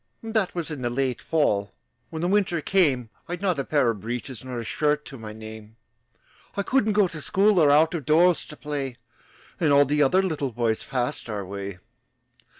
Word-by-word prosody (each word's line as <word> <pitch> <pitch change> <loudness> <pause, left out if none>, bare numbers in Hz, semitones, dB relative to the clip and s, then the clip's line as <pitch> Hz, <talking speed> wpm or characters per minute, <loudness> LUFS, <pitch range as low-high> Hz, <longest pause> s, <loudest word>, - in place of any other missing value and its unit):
That 220 -5 -1
was 170 -2 -3
in 145 -4 -5
the 120 - 0
late 130 0 -1
fall. 105 -11 +1 0.4
When 160 0 -5
the - - +2
winter 195 -3 +2
came, 145 - +1 0.2
I'd 175 +1 -4
not 180 -7 +1
a - - 0
pair 135 -4 +2
of 105 -4 -8
breeches 120 +1 -5
Nor 130 -1 -6
a 120 - -3
shirt 150 +5 0
to 135 - -9
my 110 -1 -7
name. 110 0 -10 0.8
I 200 - +1
couldn't 220 -2 +2
go 205 -2 +4
to 165 -3 -8
school, 200 +4 +3
Or 150 -3 +5
out 155 +3 +5
of 165 -4 -3
doors 170 +3 +4
to 150 - -11
play. 140 -4 -4 0.6
And 160 -4 +2
all 140 0 +6
the 150 +2 +1
other 180 +7 +4
little 150 -7 -2
boys 115 -1 0
Passed 125 -2 -3
our 105 -3 -3
way. 100 0 -6
145 Hz, 200 wpm, -25 LUFS, 120-175 Hz, 0.8 s, all